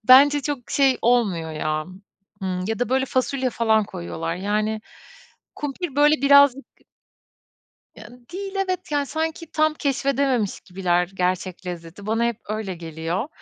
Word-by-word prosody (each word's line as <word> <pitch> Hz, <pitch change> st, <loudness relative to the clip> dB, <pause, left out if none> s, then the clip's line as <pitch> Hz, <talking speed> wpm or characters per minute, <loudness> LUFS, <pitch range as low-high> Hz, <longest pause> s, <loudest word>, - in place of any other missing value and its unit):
Bence 285 Hz, +3 st, +8 dB
çok 275 Hz, -4 st, -4 dB
şey 270 Hz, -2 st, +3 dB
olmuyor 200 Hz, -10 st, +2 dB
ya, 155 Hz, 0 st, -2 dB, 0.6 s
ımm, 185 Hz, -1 st, -2 dB
ya 225 Hz, -, -1 dB
da 245 Hz, -, 0 dB
böyle 265 Hz, +1 st, +2 dB
fasulye 260 Hz, 0 st, 0 dB
falan 220 Hz, -2 st, +2 dB
koyuyorlar, 85 Hz, -, -5 dB
yani, 210 Hz, +3 st, -1 dB, 0.7 s
kumpir 290 Hz, 0 st, -5 dB
böyle 295 Hz, +1 st, +6 dB
birazcık 280 Hz, -1 st, +6 dB, 1.3 s
Yani, 240 Hz, +3 st, -14 dB
değil 390 Hz, +1 st, -5 dB
evet, 370 Hz, -3 st, -2 dB
yani, 285 Hz, -1 st, +1 dB
sanki 320 Hz, +2 st, -3 dB
tam 310 Hz, 0 st, +2 dB
keşfedememiş 275 Hz, -6 st, 0 dB
gibiler 180 Hz, -1 st, 0 dB
gerçek 185 Hz, 0 st, -2 dB
lezzeti. 175 Hz, +3 st, -7 dB
Bana 225 Hz, +2 st, +1 dB
hep 235 Hz, -2 st, 0 dB
öyle 215 Hz, -3 st, -3 dB
geliyor. 165 Hz, -, -4 dB
235 Hz, 135 wpm, -23 LUFS, 185-280 Hz, 1.3 s, Bence